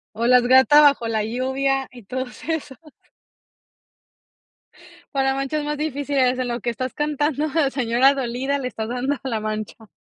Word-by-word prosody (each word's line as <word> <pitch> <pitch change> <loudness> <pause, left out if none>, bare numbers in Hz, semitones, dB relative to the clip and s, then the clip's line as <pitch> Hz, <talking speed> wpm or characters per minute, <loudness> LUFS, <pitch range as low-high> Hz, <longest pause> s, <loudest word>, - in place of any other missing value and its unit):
O, 230 +2 0
"La 250 0 +6
gata 260 +4 +6
bajo 280 -5 +4
la 220 -1 -1
lluvia" 265 +4 -1
y 245 -2 -13
todos 250 +4 -6
esos. 295 -5 -3 2.4
Para 270 -1 +1
manchas 275 +3 -2
más 295 0 -3
difíciles 280 -4 0
en 255 - -1
lo 240 0 -3
que 240 +1 -2
estás 255 +2 -5
cantando, 295 0 -1
de 300 -2 +1
señora 260 +1 +2
dolida, 265 +2 -2
le 265 -2 -3
estás 220 -2 -5
dando 250 +3 -1
a 265 - -3
la 225 -3 -1
mancha. 215 +1 -5
260 Hz, 160 wpm, -22 LUFS, 240-280 Hz, 2.4 s, La